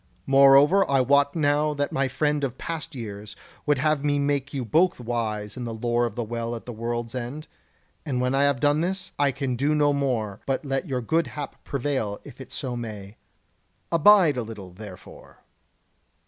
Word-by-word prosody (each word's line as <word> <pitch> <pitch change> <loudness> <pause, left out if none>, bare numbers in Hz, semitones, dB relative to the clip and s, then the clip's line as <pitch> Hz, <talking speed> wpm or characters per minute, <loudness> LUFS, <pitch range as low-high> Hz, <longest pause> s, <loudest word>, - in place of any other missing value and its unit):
Moreover, 140 +7 +6
I 135 -1 +3
wot 140 +3 +3
now 150 -1 +1
that 145 0 -1
my 135 0 +1
friend 150 +2 0
of 130 -2 -2
past 165 -2 -5
years 105 -3 -7 0.3
would 145 -1 +3
have 150 +1 +1
me 145 -1 +1
make 140 -1 0
you 135 -4 -3
both 170 - +2
wise 110 -3 -3
in 125 - -5
the 115 -1 -4
lore 120 +1 +1
of - - -9
the 120 - -2
Well 115 +1 -4
at 115 - -9
the 120 - -6
World's 115 +1 -4
End; 130 +5 -5 0.6
and 135 -5 -2
when 125 +1 0
I 140 +1 +3
have 140 -3 +1
done 145 +2 +2
this, 185 +2 -3
I 140 -1 +3
can 130 -1 -2
do 145 +5 +1
no 145 -1 +3
more, 120 -8 -1
but 135 +2 -1
let 135 +5 -2
your 130 -2 -1
good 160 +8 +1
hap 145 -2 -7
prevail 130 -7 -2
if - - -12
so 125 - -4
it - - -4
may. 105 -3 -7 0.7
Abide 170 -3 +6
a - - 0
little, 105 -5 -8
therefore." 95 0 -13
135 Hz, 190 wpm, -25 LUFS, 120-145 Hz, 0.7 s, Moreover